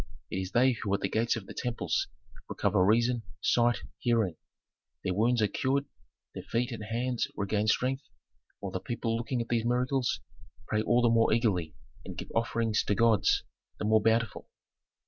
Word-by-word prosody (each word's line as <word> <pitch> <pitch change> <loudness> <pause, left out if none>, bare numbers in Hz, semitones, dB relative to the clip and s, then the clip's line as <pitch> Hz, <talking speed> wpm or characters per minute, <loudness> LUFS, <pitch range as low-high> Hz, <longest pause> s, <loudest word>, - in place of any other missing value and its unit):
It - - -1
is 95 - -4
they 130 +2 +5
who 110 -4 -3
at - - -4
the - - +1
gates 115 +4 +1
of 110 -4 -6
the - - -9
temples, 120 -2 -1 0.4
recover 90 - +2
reason, 115 +4 +3 0.2
sight, 120 0 +2 0.2
hearing; 115 -8 +1 0.7
their 95 - 0
wounds 115 +3 +2
are - - +4
cured, 135 +7 0 0.5
their - - -6
feet 120 +1 -1
and 115 -2 -5
hands 120 +2 -1
regain 105 +1 0
strength, 130 +4 0 0.5
while 100 - -4
the 95 - -2
people 115 +3 -2
looking 120 +2 -2
at 115 - -18
these 115 -2 +1
miracles 125 +2 +1 0.5
pray 110 -1 0
all 120 +2 +3
the 120 - +5
more 115 0 +4
eagerly 100 -8 +1 0.3
and 95 - -8
give - - -6
offerings 115 -2 +1
to 105 - +1
gods 115 -2 +3 0.3
the - - -3
more 110 0 +4
bountiful. 115 0 +1
115 Hz, 175 wpm, -30 LUFS, 105-120 Hz, 0.7 s, they